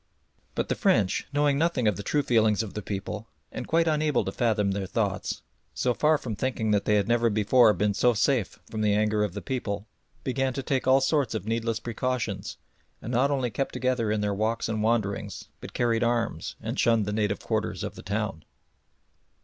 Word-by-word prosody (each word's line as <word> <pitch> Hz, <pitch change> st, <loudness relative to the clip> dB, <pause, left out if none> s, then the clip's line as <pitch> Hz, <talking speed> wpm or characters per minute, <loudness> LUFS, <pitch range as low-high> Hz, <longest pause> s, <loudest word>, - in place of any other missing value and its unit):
But -, -, -1 dB
the -, -, +1 dB
French, 115 Hz, -, +1 dB
knowing 145 Hz, -1 st, +2 dB
nothing 160 Hz, -8 st, +1 dB
of 105 Hz, -, +2 dB
the 100 Hz, -, -5 dB
true 145 Hz, +8 st, 0 dB
feelings 110 Hz, -3 st, +3 dB
of 105 Hz, -, -7 dB
the 105 Hz, -, -4 dB
people, 100 Hz, +2 st, -5 dB, 0.2 s
and -, -, -6 dB
quite 165 Hz, +1 st, +2 dB
unable 150 Hz, -4 st, +1 dB
to -, -, -2 dB
fathom 105 Hz, -4 st, +1 dB
their 95 Hz, -1 st, -2 dB
thoughts, 100 Hz, -2 st, -2 dB, 0.3 s
so 125 Hz, -, +1 dB
far 155 Hz, +4 st, +3 dB
from 115 Hz, -6 st, -5 dB
thinking 115 Hz, -2 st, -1 dB
that 105 Hz, -1 st, +2 dB
they 105 Hz, -, +3 dB
had 100 Hz, -1 st, +2 dB
never 120 Hz, 0 st, +3 dB
before 110 Hz, +2 st, +5 dB
been 105 Hz, 0 st, +1 dB
so 120 Hz, +4 st, +3 dB
safe 120 Hz, -1 st, +1 dB
from 110 Hz, -, -4 dB
the 105 Hz, -1 st, +3 dB
anger 105 Hz, 0 st, +2 dB
of 105 Hz, -3 st, -3 dB
the 105 Hz, -, -5 dB
people, 105 Hz, -6 st, -3 dB, 0.4 s
began 135 Hz, 0 st, 0 dB
to 135 Hz, -, -4 dB
take 130 Hz, 0 st, -1 dB
all 135 Hz, +1 st, +5 dB
sorts 135 Hz, -3 st, +1 dB
of 95 Hz, -, -3 dB
needless 115 Hz, 0 st, -1 dB
precautions, 125 Hz, +1 st, -3 dB, 0.4 s
and 120 Hz, -, -6 dB
not 130 Hz, +4 st, +3 dB
only 130 Hz, -4 st, 0 dB
kept 135 Hz, +6 st, -2 dB
together 125 Hz, -4 st, 0 dB
in 105 Hz, -1 st, 0 dB
their 105 Hz, -1 st, 0 dB
walks 110 Hz, +3 st, -1 dB
and 110 Hz, -1 st, -2 dB
wanderings, 110 Hz, -3 st, -1 dB
but -, -, -9 dB
carried 120 Hz, -1 st, +1 dB
arms 115 Hz, -8 st, -1 dB
and -, -, -4 dB
shunned 115 Hz, -2 st, +3 dB
the 105 Hz, -, -2 dB
native 105 Hz, -1 st, 0 dB
quarters -, -, -2 dB
of -, -, -4 dB
the -, -, -10 dB
town. 100 Hz, -4 st, -3 dB
115 Hz, 205 wpm, -27 LUFS, 105-130 Hz, 0.4 s, before